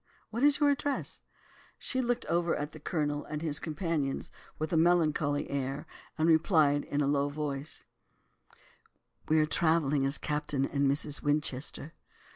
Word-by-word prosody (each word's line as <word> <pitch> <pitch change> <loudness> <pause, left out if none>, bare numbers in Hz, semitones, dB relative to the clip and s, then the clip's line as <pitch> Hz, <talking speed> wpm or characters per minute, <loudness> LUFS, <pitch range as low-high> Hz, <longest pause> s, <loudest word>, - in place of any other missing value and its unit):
What 230 +2 -3
is 290 0 +5
your 290 -1 +5
address?' 285 0 -2 0.6
She 260 - -2
looked 245 -1 -1
over 170 0 +1
at 150 +1 -4
the 155 - -11
Colonel 150 -2 -1
and 155 +1 -5
his 150 -3 0
companions 155 -3 -2 0.3
with 155 +2 -3
a - - +3
melancholy 160 -3 +2
air, 140 +2 -2 0.3
and 160 0 +2
replied 155 -3 +4
in 145 - -1
a - - +2
low 140 0 +2
voice, 145 0 -4 1.4
'We 155 - +3
are - - +3
travelling 155 -3 +2
as 140 - -1
"Captain 150 -2 -1
and 140 0 +1
Mrs. 145 +1 0
Winchester." 145 0 -1
150 Hz, 150 wpm, -30 LUFS, 145-165 Hz, 1.4 s, is